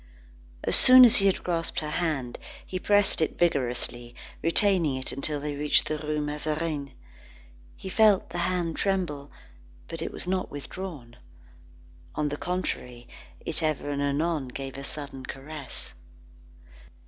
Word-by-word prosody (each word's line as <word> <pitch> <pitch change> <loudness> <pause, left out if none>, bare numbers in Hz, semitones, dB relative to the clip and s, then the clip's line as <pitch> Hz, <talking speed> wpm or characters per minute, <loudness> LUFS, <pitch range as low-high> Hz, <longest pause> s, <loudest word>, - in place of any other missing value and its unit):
As - - +3
soon 255 0 +9
as 235 - +5
he 195 - +4
had 195 - +1
grasped 170 -2 0
her 150 -1 -4
hand, 150 -9 -2 0.3
he 185 - -4
pressed 205 -2 +3
it 160 - 0
vigorously, 120 -6 0 0.3
retaining 170 -3 +3
it 130 0 -2
until 145 +2 0
they 145 0 -4
reached 150 +1 +3
the 155 - -2
Rue 150 0 -2
Mazarine. 150 -1 -2 0.8
He - - -9
felt 205 0 +3
the - - -4
hand 175 -3 -1
tremble; 175 -8 -1 0.6
but - - -7
it - - -3
was - - -5
not 185 +1 -1
withdrawn. 145 -4 -8 1.0
On 150 -1 0
the 145 - -4
contrary 125 -10 -4 0.3
it 165 - -4
ever 155 -2 -1
and 140 0 -2
anon 145 0 0
gave 135 +1 -7
a 140 - -7
sudden 140 -2 -6
caress. 140 +1 -7
150 Hz, 145 wpm, -27 LUFS, 140-180 Hz, 1.0 s, soon